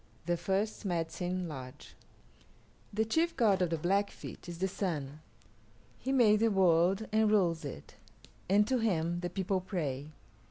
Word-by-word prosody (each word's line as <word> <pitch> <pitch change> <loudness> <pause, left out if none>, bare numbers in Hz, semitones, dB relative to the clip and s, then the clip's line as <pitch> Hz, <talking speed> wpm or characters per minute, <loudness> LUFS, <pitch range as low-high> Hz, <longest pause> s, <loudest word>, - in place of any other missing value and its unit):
THE 175 0 +1
FIRST 195 +6 -1
MEDICINE 180 0 -2
LODGE 130 -4 -9 1.0
The 220 +2 0
chief 325 +9 0
god 205 -6 +3
of 180 - +2
the 165 - -1
Blackfeet 195 +2 -2
is 170 - -6
the 190 +2 0
Sun. 155 -7 -3 0.8
He 265 - -3
made 225 -6 +5
the 225 +1 +3
world 190 +1 +3
and 220 0 +3
rules 175 -6 +2
it, 135 - -8 0.5
and 205 +2 +4
to 255 -1 +1
him 175 -6 0
the 175 0 -3
people 190 +1 -1
pray. 150 -7 -3
185 Hz, 150 wpm, -32 LUFS, 165-210 Hz, 1.0 s, made